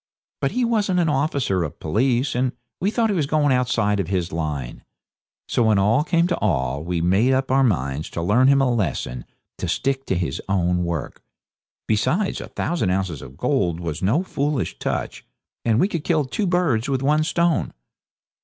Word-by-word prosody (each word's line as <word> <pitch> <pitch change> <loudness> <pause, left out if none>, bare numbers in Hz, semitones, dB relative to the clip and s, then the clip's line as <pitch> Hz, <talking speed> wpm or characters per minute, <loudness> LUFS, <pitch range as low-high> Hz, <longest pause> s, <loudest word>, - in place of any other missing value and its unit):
But - - -1
he 250 0 +1
wasn't 205 -6 +1
an 165 -2 +2
officer 140 - 0
of 75 - -6
police, 120 - +1
and 125 0 0 0.3
we 190 - +1
thought 225 0 +1
he - - 0
was 155 -6 0
going 145 -2 +2
outside 115 -5 +1
of 95 - -1
his 90 -2 -1
line. 75 -7 -4 0.6
So - - 0
when 110 -3 +4
all 110 +8 +3
came 170 0 +2
to 175 -1 0
all, 70 0 0
we 85 0 -2
made 100 +9 +3
up 130 0 0
our 135 +1 +4
minds 75 - 0
to 85 - -4
learn 110 +9 +4
him 135 0 +5
a 125 -2 +2
lesson 75 - -2 0.3
to - - -2
stick 135 0 -1
to - - +1
his 85 -6 -2
own 90 -2 +1
work; 85 -5 -4 0.7
besides, 170 - 0
a - - -7
thousand 165 - -1
ounces 90 -7 -1
of 65 +2 -11
gold 90 - 0
was 85 -2 -4
no 115 - +2
foolish 145 -5 -2
touch, - - -3 0.4
and 115 -1 +2
we 190 - +4
could 170 -7 -4
kill 160 -4 +1
two 195 +10 -2
birds 160 -10 +1
with 135 -1 0
one 150 +2 +3
stone. 170 0 +1
125 Hz, 190 wpm, -22 LUFS, -, 0.7 s, him